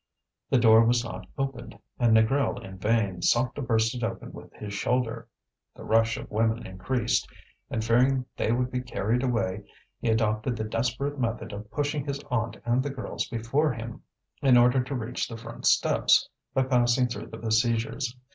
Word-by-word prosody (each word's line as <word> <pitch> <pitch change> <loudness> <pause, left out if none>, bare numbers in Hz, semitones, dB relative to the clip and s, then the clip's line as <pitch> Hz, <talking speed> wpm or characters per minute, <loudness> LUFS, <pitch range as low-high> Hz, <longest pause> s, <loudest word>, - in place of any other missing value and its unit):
The 135 - +4
door 115 -1 +7
was 120 +1 +2
not 115 - -7
opened, 135 -3 -4 0.2
and 115 -2 +5
Négrel 125 +1 +1
in 95 -1 -10
vain 105 -3 0
sought 120 +5 +2
to - - -5
burst 115 -3 +1
it 120 -2 -5
open 115 -1 -4
with - - -12
his 105 -1 -7
shoulder. 120 +3 -1 0.5
The - - -11
rush 115 +1 +2
of - - -9
women 110 +2 0
increased, 110 +6 -1 0.4
and 110 -1 -2
fearing 125 +3 +3
they - - 0
would 125 +1 0
be 125 - -1
carried 120 -1 -1
away, 115 -7 -1 0.4
he 120 - -1
adopted 110 +2 +1
the 110 - -2
desperate 125 +6 -2
method 115 -3 -2
of 105 +1 -8
pushing 145 +1 -1
his 140 -1 -3
aunt 115 -2 -1
and 120 +2 +2
the 145 - -3
girls 135 -2 -4
before 125 +6 0
him, 115 0 -7 0.4
in 130 -3 +6
order 125 +2 +4
to 135 +2 -4
reach 125 0 -3
the 115 - -7
front 115 0 -5
steps, - - +4 0.3
by 135 - +4
passing 125 -1 +3
through 120 - -5
the 115 - -9
besiegers. 115 +1 0
120 Hz, 180 wpm, -27 LUFS, 110-125 Hz, 0.5 s, door